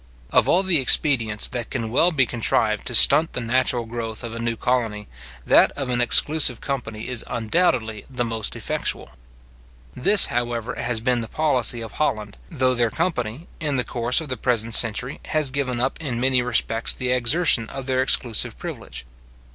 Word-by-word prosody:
Of - - +2
all 185 - +3
the 185 -5 +2
expedients 120 -5 +2
that 120 -2 -6
can 115 -4 -5
well 165 +8 +3
be 135 -6 +1
contrived 110 -2 -1
to 120 - -2
stunt 160 +7 +6
the - - -3
natural 120 0 -1
growth 115 -1 -6
of 115 -1 -6
a 115 - -7
new 115 0 -2
colony, 115 -5 -2 0.4
that - - +4
of 135 -3 -4
an 125 0 -1
exclusive 130 0 +3
company 115 -6 -6
is 125 -2 -1
undoubtedly 115 -2 -1
the 125 -2 -3
most 115 -2 -3
effectual. - - -3 0.8
This, 200 +10 +6
however, 120 0 -3
has 120 -1 -3
been 125 0 0
the 115 - -6
policy 130 -6 +1
of 115 - -8
Holland, 110 -9 -3
though 130 -5 0
their 120 -2 0
company, 125 +1 -3
in 150 -4 -2
the 125 - +1
course 120 +3 0
of 160 - -7
the 130 - -3
present 115 -1 -1
century, 115 +4 +2
has 155 -4 -1
given 130 -3 -3
up 130 +5 -2
in 125 -7 -4
many 130 0 +2
respects 115 -2 +1
the 125 -1 -2
exertion 125 -1 +2
of 135 -1 -7
their 130 -1 0
exclusive 120 -4 +1
privilege. - - -9
125 Hz, 180 wpm, -21 LUFS, 115-135 Hz, 0.8 s, stunt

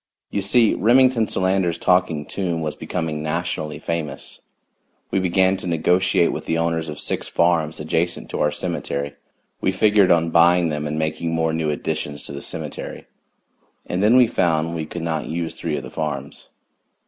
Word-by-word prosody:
You 100 - -1
see 110 +3 +4
Remington 120 0 +4
Solander's 95 -3 +1
Talking 90 -4 +1
Tomb 85 -3 -2
was 75 -1 -3
becoming 80 -2 -3
nationally 75 0 -3
famous. 80 -4 -5 0.7
We 95 - +2
began 95 +1 +2
to 95 - -5
negotiate 85 +1 +2
with - - -6
the 80 - +1
owners 80 -1 -1
of 75 - -6
six - - -1
farms 85 -2 +1
adjacent 80 +3 -1
to - - -2
our 75 - +3
cemetery; 70 -1 -3 0.5
we 95 - +2
figured 105 0 +4
on 85 -1 +3
buying 85 +1 +5
them 75 0 -3
and 75 +1 -3
making 80 +1 -1
more 80 0 0
new 80 -1 -1
additions 75 -1 -3
to - - -7
the 70 0 -6
cemetery. - - -6 0.8
And 90 - -2
then 110 +4 +5
we 125 -1 +7
found 85 -7 0
we 80 -2 -4
could 85 +1 -6
not 80 -2 -2
use 85 0 -3
three - - -3
of - - -5
the - - -9
farms. 70 -3 -5
85 Hz, 170 wpm, -22 LUFS, 80-95 Hz, 0.8 s, we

